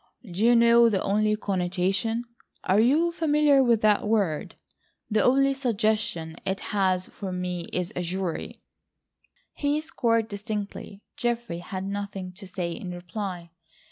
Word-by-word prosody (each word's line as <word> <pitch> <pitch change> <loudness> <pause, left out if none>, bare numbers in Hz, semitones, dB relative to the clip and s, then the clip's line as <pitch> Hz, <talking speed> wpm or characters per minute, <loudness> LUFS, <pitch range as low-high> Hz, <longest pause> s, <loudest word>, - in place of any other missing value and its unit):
Do 195 -2 -4
you 240 +1 +6
know, 235 0 +6
the 200 -3 +1
only 215 +2 +2
connotation—(are 200 +3 -1
you 300 +9 +3
familiar 300 -4 +3
with 235 -3 +3
that 210 -1 +3
word?)—the 210 +2 -2
only 275 +2 +4
suggestion 215 - -1
it 190 0 -2
has 185 -2 +2
for 195 -2 -7
me 180 -1 -3
is 180 -1 -2
a 180 - -1
jury?" 180 -1 -4 0.9
He 290 +1 0
scored 230 -7 0
distinctly. 205 -1 -6
Geoffrey 235 -7 -2
had 185 +2 -5
nothing 200 -1 -5
to 195 +1 -10
say 180 -2 -3
in 180 +2 -6
reply. 175 -1 -6
205 Hz, 130 wpm, -26 LUFS, 185-235 Hz, 0.9 s, you